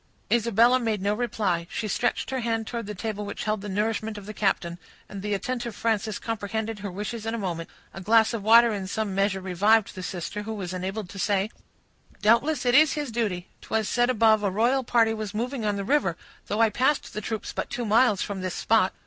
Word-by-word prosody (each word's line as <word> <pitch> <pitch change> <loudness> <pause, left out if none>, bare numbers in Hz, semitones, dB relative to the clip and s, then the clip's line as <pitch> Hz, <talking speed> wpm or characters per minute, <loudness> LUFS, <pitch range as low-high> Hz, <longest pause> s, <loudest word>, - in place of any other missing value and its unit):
Isabella 235 +2 +4
made 225 -4 -1
no 200 +2 0
reply; 205 -7 -1
she 215 - -3
stretched 240 +5 -1
her 260 - -1
hand 225 -2 -1
towards 230 -2 -5
the 210 - -5
table 210 +1 -4
which 205 - -5
held 215 -1 -1
the 205 - -6
nourishment 215 +2 -1
of 205 - -9
the 215 - -7
captain, 175 -4 -1 0.3
and 200 - -7
the 210 0 -1
attentive 240 0 -3
Frances 220 -1 -1
comprehended 220 0 -3
her 200 0 -5
wishes 210 +4 -5
in 225 - -1
a - - -3
moment. 175 -5 -4 0.2
A 195 - -8
glass 220 +3 +4
of 230 - -2
water 230 +2 +6
in 195 -2 -4
some 210 0 -2
measure 195 0 +1
revived 200 +4 +2
the 185 - -7
sister, 180 +3 -4
who 220 +1 -5
was 185 -3 -5
enabled 190 +3 -4
to 195 - -9
say,— 200 +2 +1 0.7
"Doubtless 250 +6 +3
it 245 - +3
is 305 +2 +6
his 295 -5 -3
duty. 205 -6 -2
'Twas 220 -1 -1
said 240 0 +2
above, 220 -3 +4
a 205 - +1
royal 240 +7 +2
party 230 -2 +3
was 215 -1 -5
moving 245 +1 -2
on 205 -1 +1
the 200 - -3
river; 200 - +1 0.3
though 210 +2 0
I 225 -1 +4
passed 265 +6 +1
the 215 - -4
troops 220 +1 -4
but - - -3
two 245 -1 -3
miles 215 -1 +3
from 200 -2 -5
this 185 -1 -3
spot." 215 -4 +2
215 Hz, 220 wpm, -26 LUFS, 200-230 Hz, 0.7 s, water